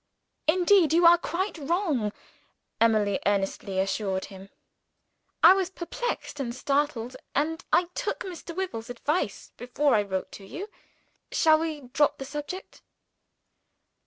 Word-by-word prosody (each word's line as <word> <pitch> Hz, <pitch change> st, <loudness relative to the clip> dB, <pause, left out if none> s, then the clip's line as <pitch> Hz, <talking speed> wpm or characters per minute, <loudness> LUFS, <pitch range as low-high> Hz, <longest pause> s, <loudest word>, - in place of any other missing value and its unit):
"Indeed 355 Hz, 0 st, +4 dB
you 340 Hz, +1 st, +5 dB
are 340 Hz, 0 st, +8 dB
quite 360 Hz, +1 st, -3 dB
wrong!" 295 Hz, -, 0 dB, 0.7 s
Emily 215 Hz, -3 st, +3 dB
earnestly 195 Hz, -1 st, -1 dB
assured 195 Hz, 0 st, -1 dB
him. 195 Hz, 0 st, -12 dB, 0.9 s
"I -, -, +10 dB
was 380 Hz, -2 st, 0 dB
perplexed 375 Hz, -2 st, -4 dB
and 240 Hz, -3 st, -3 dB
startled 275 Hz, -3 st, -1 dB, 0.2 s
and 320 Hz, +3 st, 0 dB
I 355 Hz, -, +5 dB
took -, -, -3 dB
Mr. 345 Hz, -2 st, -7 dB
Wyvil's 305 Hz, -12 st, -4 dB
advice, 245 Hz, -, -2 dB
before 265 Hz, +4 st, +1 dB
I 210 Hz, -, +4 dB
wrote 190 Hz, -2 st, -4 dB
to 200 Hz, -, -10 dB
you. 385 Hz, -, -7 dB, 0.6 s
Shall 315 Hz, -1 st, +4 dB
we 315 Hz, -2 st, -3 dB
drop 280 Hz, +3 st, +1 dB
the 270 Hz, -, -6 dB
subject?" 295 Hz, +7 st, -7 dB
290 Hz, 130 wpm, -27 LUFS, 225-345 Hz, 0.9 s, I